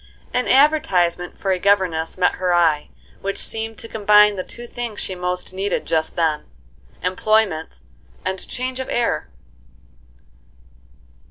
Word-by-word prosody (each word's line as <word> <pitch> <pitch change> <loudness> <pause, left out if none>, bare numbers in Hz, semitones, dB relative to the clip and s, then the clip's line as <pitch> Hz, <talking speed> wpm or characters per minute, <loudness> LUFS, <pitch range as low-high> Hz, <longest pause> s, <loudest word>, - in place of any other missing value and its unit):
An 250 - 0
advertisement 185 - +3
for 195 - -1
a 185 - +1
governess 185 -5 +1
met 180 - +2
her 180 -1 +2
eye, 160 -4 +2 0.3
which 195 0 -3
seemed 225 0 -2
to - - -7
combine 210 -1 +5
the 185 - -3
two 240 - -8
things 235 -3 -5
she 190 - -3
most 180 0 -2
needed 195 +1 -2
just 160 -1 -1
then,—employment 160 - -1 0.4
and 190 0 -3
change 255 +1 -3
of 260 - -4
air. 240 -1 0
190 Hz, 125 wpm, -21 LUFS, 175-220 Hz, 0.4 s, combine